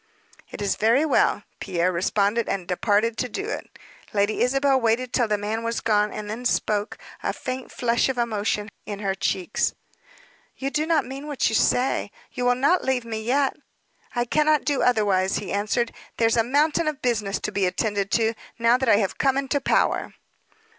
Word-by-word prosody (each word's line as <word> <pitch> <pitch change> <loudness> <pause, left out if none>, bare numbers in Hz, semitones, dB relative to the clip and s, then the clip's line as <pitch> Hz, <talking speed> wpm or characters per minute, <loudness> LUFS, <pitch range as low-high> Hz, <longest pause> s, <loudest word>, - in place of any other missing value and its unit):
"It - - -6
is 200 - 0
very 235 +8 +3
well," 305 - +2 0.2
Pierre 180 -1 0
responded; 200 +5 +1
and 190 -3 -2
departed 210 +4 +1
to 250 - -1
do 400 - -4
it. 450 - -6 0.4
Lady 205 +1 +1
Isabel 270 +1 +3
waited 235 +2 0
till 240 -3 +2
the 210 -1 +1
man 210 +2 -3
was 230 0 -1
gone, 210 -1 +2
and 210 -1 -6
then 220 +4 -5
spoke, 210 -3 0 0.2
a - - -1
faint 255 0 -6
flush 235 +1 +1
of 260 - -2
emotion 215 -2 -1 0.2
in 205 - -4
her 195 -1 -1
cheeks. 190 +1 -1 0.8
"You 275 +1 -3
do 305 +2 0
not 320 -5 +2
mean 270 +3 -7
what 290 -3 0
you - - -4
say? 250 +3 +2 0.2
You 250 - -3
will 245 0 +4
not 285 +8 +2
leave 260 -2 0
me 220 -1 -4
yet?" 270 +4 +1 0.6
"I 240 0 +1
cannot 300 +3 +2
do 285 -2 +1
otherwise," 200 -6 +2
he - - -3
answered. 215 +4 0 0.2
"There's 225 -1 +3
a 230 - +3
mountain 300 +6 +2
of 300 -3 -3
business 220 -5 0
to - - -3
be 195 -2 +1
attended 200 +1 -1
to, 225 -1 +2 0.2
now 235 +1 +3
that 260 -3 +1
I - - +7
am 200 -2 +2
come 270 -1 +2
into 275 +1 0
power." - - +1
230 Hz, 190 wpm, -24 LUFS, 210-265 Hz, 0.8 s, I